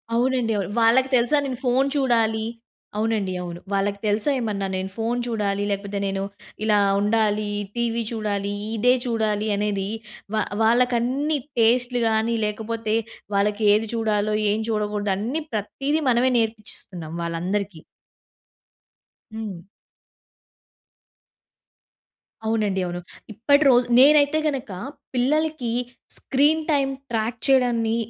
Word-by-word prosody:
అవునండి 245 Hz, -1 st, +1 dB
అవును. 195 Hz, -2 st, -2 dB
వాళ్ళకి 255 Hz, +4 st, +4 dB
తెలుసా 245 Hz, +5 st, +3 dB
నేను 255 Hz, -3 st, -4 dB
ఫోన్ 255 Hz, +3 st, +3 dB
చూడాలి 225 Hz, -5 st, +2 dB, 0.5 s
అవునండి 215 Hz, -3 st, 0 dB
అవును. 175 Hz, -1 st, -6 dB
వాళ్ళకి 200 Hz, 0 st, 0 dB
తెలుసా 210 Hz, +5 st, +1 dB
ఏమన్నా 205 Hz, -4 st, -2 dB
నేను 190 Hz, 0 st, -3 dB
ఫోన్ 230 Hz, +2 st, -1 dB
చూడాలి, 205 Hz, -3 st, -1 dB
లేకపోతే 200 Hz, 0 st, -3 dB
నేను 195 Hz, 0 st, -2 dB, 0.4 s
ఇలా 215 Hz, -1 st, +3 dB, 0.2 s
ఉండాలి, 210 Hz, 0 st, +1 dB, 0.3 s
టీవీ 235 Hz, -1 st, 0 dB
చూడాలి, 205 Hz, -3 st, -2 dB, 0.2 s
ఇదే 245 Hz, +3 st, +4 dB
చూడాలి 220 Hz, -2 st, 0 dB
అనేది 200 Hz, -1 st, -1 dB, 0.5 s
వా 215 Hz, -, +2 dB, 0.2 s
వాళ్ళకన్నీ 250 Hz, +5 st, +2 dB, 0.2 s
టేస్ట్‌లు‌గాని 230 Hz, -1 st, +2 dB
లేకపోతే 220 Hz, +1 st, -2 dB, 0.4 s
వాళ్ళకేది 210 Hz, +1 st, +2 dB
చూడాలో 215 Hz, -2 st, 0 dB, 0.2 s
ఏం 215 Hz, +2 st, 0 dB
చూడకూడదో 210 Hz, -2 st, -1 dB
అన్నీ 245 Hz, +10 st, -2 dB
ప్రతీదీ 275 Hz, +9 st, -1 dB
మనమే 250 Hz, +1 st, +3 dB
నేర్పిచ్చిస్తున్నాం 210 Hz, -7 st, -4 dB
వాళ్ళందరికీ. 175 Hz, +1 st, -3 dB, 1.5 s
హ్మ్. 215 Hz, -5 st, -5 dB, 2.9 s
అవునండి 210 Hz, -4 st, 0 dB
అవును. 175 Hz, 0 st, -4 dB, 0.3 s
ఇప్పటి 285 Hz, +8 st, +3 dB
రోజు 245 Hz, -1 st, +4 dB
నేనైతే 290 Hz, +2 st, +6 dB
గనుక 270 Hz, -7 st, -3 dB, 0.4 s
పిల్లలకి 280 Hz, 0 st, 0 dB, 0.5 s
స్క్రీన్ 295 Hz, +4 st, +2 dB
టైమ్ 275 Hz, -2 st, +2 dB, 0.2 s
ట్రాక్ 225 Hz, +1 st, -1 dB
చేయడాన్ని 240 Hz, -4 st, +3 dB
225 Hz, 105 wpm, -23 LUFS, 205-245 Hz, 2.9 s, నేనైతే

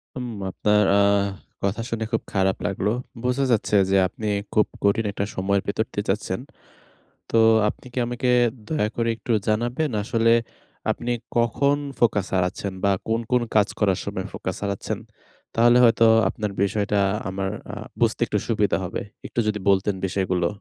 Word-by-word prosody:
হুম। 125 Hz, -1 st, -4 dB, 0.2 s
আপনার 105 Hz, +2 st, +2 dB
আ -, -, +5 dB, 0.6 s
কথা 100 Hz, +4 st, 0 dB
শুনে 115 Hz, -1 st, -2 dB
খুব 115 Hz, -, +1 dB
খারাপ 95 Hz, -1 st, +2 dB
লাগলো। 100 Hz, +1 st, -1 dB, 0.3 s
বোঝা 125 Hz, +2 st, +1 dB
যাচ্ছে 110 Hz, -2 st, +1 dB
যে 95 Hz, -, +4 dB
আপনি 105 Hz, +4 st, -6 dB, 0.3 s
খুব 105 Hz, -, +4 dB, 0.2 s
কঠিন 100 Hz, +3 st, +2 dB
একটা 100 Hz, 0 st, -2 dB
সময়ের 100 Hz, +1 st, +1 dB
ভেতর 110 Hz, +2 st, 0 dB
দিয়ে 105 Hz, -, -2 dB
যাচ্ছেন। 95 Hz, -1 st, -1 dB, 0.9 s
তো -, -, +1 dB, 0.3 s
আপনি 115 Hz, -, -7 dB
কি -, -, -3 dB
আমাকে 120 Hz, +1 st, -2 dB, 0.4 s
দয়া 155 Hz, -9 st, +1 dB
করে 115 Hz, -1 st, 0 dB
একটু 115 Hz, +2 st, -3 dB, 0.2 s
জানাবেন, 120 Hz, +8 st, 0 dB
আসলে 115 Hz, +1 st, +2 dB, 0.6 s
আপনি 120 Hz, -, -2 dB, 0.3 s
কখন 120 Hz, +5 st, +2 dB, 0.2 s
ফোকাস 105 Hz, -4 st, +3 dB
হারাচ্ছেন? 95 Hz, +2 st, -1 dB
বা 100 Hz, -, +4 dB, 0.2 s
কোন, 115 Hz, +1 st, +1 dB
কোন, 125 Hz, -1 st, +3 dB
কাজ 105 Hz, -1 st, +4 dB
করার 95 Hz, -4 st, +2 dB
সময় -, -, -4 dB
ফোকাস -, -, -4 dB
হারাচ্ছেন? 100 Hz, -1 st, -3 dB, 0.6 s
তাহলে 120 Hz, +1 st, +5 dB
হয়তো 115 Hz, -1 st, +5 dB, 0.2 s
আপনার 105 Hz, -1 st, -3 dB
বিষয়টা 100 Hz, +1 st, 0 dB, 0.3 s
আমার 95 Hz, 0 st, -2 dB, 0.2 s
আ -, -, -4 dB, 0.3 s
বুঝতে 115 Hz, -2 st, +2 dB
একটু 105 Hz, -, 0 dB
সুবিধা 105 Hz, -3 st, +2 dB
হবে। 90 Hz, -, -4 dB, 0.3 s
একটু -, -, -2 dB
যদি 105 Hz, -1 st, 0 dB
বলতেন 100 Hz, +1 st, +3 dB
বিষয়গুলো। 90 Hz, -2 st, 0 dB
105 Hz, 155 wpm, -24 LUFS, 100-115 Hz, 0.9 s, আ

